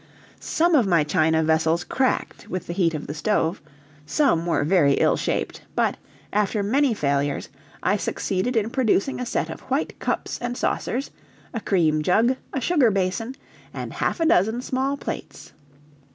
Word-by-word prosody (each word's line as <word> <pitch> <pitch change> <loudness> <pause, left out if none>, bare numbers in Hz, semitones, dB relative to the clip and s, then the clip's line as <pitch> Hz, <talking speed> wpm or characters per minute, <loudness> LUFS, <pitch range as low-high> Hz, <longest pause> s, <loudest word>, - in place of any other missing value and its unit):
Some 340 +2 +1
of 255 -9 +4
my 170 -4 +4
china 160 +2 +2
vessels 160 +2 +2
cracked 260 -1 -1
with 185 -1 -4
the 170 - -4
heat 170 -3 +1
of 150 - -5
the 145 - -5
stove, 165 0 0 0.4
some 170 - +1
were 165 - +1
very 150 -3 +4
ill - - +3
shaped; - - -2
but, - - +2 0.4
after 210 0 +1
many 260 +3 +2
failures, 140 -4 -1 0.3
I - - +2
succeeded 195 +7 -2
in 225 0 +1
producing 255 -1 +1
a 250 - -3
set - - -1
of - - -7
white - - -1
cups - - -2
and 245 0 -3
saucers, 265 +4 -2 0.4
a 230 - -2
cream 160 -7 +2
jug, 220 +10 +3 0.2
a 270 - -2
sugar 275 -2 +3
basin, 200 +5 -1 0.4
and - - -5
half - - -1
a 330 - +2
dozen 225 - +3
small 270 +2 -1
plates. - - -7
200 Hz, 165 wpm, -24 LUFS, 160-250 Hz, 0.4 s, of